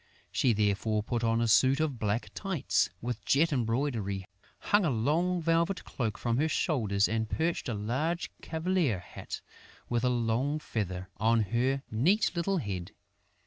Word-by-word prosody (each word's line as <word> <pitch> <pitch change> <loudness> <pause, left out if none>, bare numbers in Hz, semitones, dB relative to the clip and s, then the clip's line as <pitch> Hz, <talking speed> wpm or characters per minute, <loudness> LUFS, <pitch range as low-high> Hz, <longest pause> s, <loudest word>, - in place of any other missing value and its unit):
She 125 - +3
therefore 105 0 +1
put 120 +1 -2
on 115 0 +2
a 115 - +2
suit 130 +5 +5
of 150 -6 -1
black 105 +2 -1
tights, 190 -8 0
with 120 -1 -3
jet 155 +3 +3
embroidery, 115 -6 -1 0.3
hung 205 0 +2
a 170 - +2
long 160 +9 +1
velvet 170 +3 +1
cloak 110 -5 -3
from 120 -1 0
her 155 +4 +2
shoulders 110 - +1
and 110 0 -1
perched 165 -4 -1
a 115 - -1
large 135 +12 -1
cavalier 160 - 0
hat, 90 - -8 0.5
with 120 0 0
a 125 - +3
long 120 +4 0
feather, 95 - -4
on 115 +3 +3
her 135 +3 +1
neat 165 - +3
little 185 +3 0
head. 95 - -4
120 Hz, 155 wpm, -30 LUFS, 110-155 Hz, 0.5 s, suit